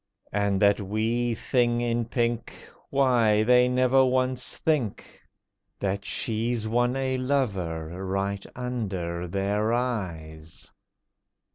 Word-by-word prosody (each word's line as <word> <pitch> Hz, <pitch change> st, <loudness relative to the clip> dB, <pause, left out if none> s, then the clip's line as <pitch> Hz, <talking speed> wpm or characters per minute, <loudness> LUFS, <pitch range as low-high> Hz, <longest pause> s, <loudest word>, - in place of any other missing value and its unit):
And 100 Hz, -1 st, +1 dB
that 100 Hz, +1 st, +4 dB
wee 115 Hz, +4 st, 0 dB
thing 120 Hz, 0 st, +1 dB
in 120 Hz, -1 st, 0 dB
pink— 120 Hz, 0 st, -1 dB, 0.3 s
Why, 120 Hz, -6 st, +3 dB
they 125 Hz, +2 st, +5 dB
never 130 Hz, +1 st, +4 dB
once 130 Hz, -1 st, 0 dB
think 140 Hz, -10 st, -2 dB, 0.6 s
That 100 Hz, 0 st, -2 dB
she's 110 Hz, +3 st, -1 dB
won 120 Hz, +3 st, +1 dB
a 130 Hz, -1 st, -1 dB
lover 95 Hz, -, -2 dB
right 100 Hz, +1 st, -2 dB
under 95 Hz, -9 st, -3 dB
their 100 Hz, +4 st, 0 dB
eyes. 85 Hz, -10 st, -4 dB
115 Hz, 105 wpm, -26 LUFS, 100-125 Hz, 0.6 s, they